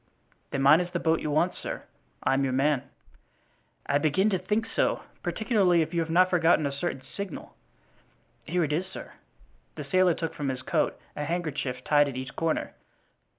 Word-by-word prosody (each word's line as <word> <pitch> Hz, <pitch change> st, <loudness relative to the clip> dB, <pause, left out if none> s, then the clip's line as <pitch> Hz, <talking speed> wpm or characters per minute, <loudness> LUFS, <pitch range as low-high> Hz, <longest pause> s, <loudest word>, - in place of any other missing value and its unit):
"Then 135 Hz, -, -1 dB
mine 145 Hz, +4 st, +7 dB
is 180 Hz, 0 st, -2 dB
the 175 Hz, -1 st, -2 dB
boat 165 Hz, 0 st, +2 dB
you 155 Hz, -, -3 dB
want, 155 Hz, +5 st, +2 dB
sir. -, -, -6 dB, 0.4 s
I'm 135 Hz, +1 st, +2 dB
your 130 Hz, -1 st, 0 dB
man." 140 Hz, 0 st, +1 dB, 1.0 s
"I 145 Hz, -, +2 dB
begin 175 Hz, +8 st, +2 dB
to 190 Hz, -, +1 dB
think 210 Hz, +5 st, 0 dB
so, -, -, 0 dB, 0.2 s
particularly 195 Hz, -7 st, +2 dB
if 160 Hz, -, -8 dB
you 170 Hz, -, +1 dB
have 165 Hz, -1 st, -1 dB
not 180 Hz, +2 st, +4 dB
forgotten 165 Hz, -3 st, +4 dB
a 140 Hz, -, 0 dB
certain 140 Hz, -1 st, -3 dB
signal." 190 Hz, +6 st, -7 dB, 0.9 s
"Here 175 Hz, +2 st, 0 dB
it 150 Hz, -1 st, -1 dB
is, 180 Hz, +5 st, -1 dB
sir," 190 Hz, -, -9 dB
and -, -, -20 dB, 0.6 s
the 150 Hz, -3 st, -7 dB
sailor 185 Hz, 0 st, +3 dB
took 165 Hz, -1 st, -3 dB
from 145 Hz, -2 st, -3 dB
his 130 Hz, -1 st, -4 dB
coat -, -, 0 dB, 0.2 s
a 150 Hz, -, -3 dB
handkerchief, 150 Hz, -6 st, -3 dB
tied 145 Hz, -1 st, +4 dB
at 130 Hz, -, -6 dB
each 130 Hz, 0 st, -6 dB
corner. 165 Hz, -1 st, -1 dB
160 Hz, 190 wpm, -27 LUFS, 140-180 Hz, 1.0 s, mine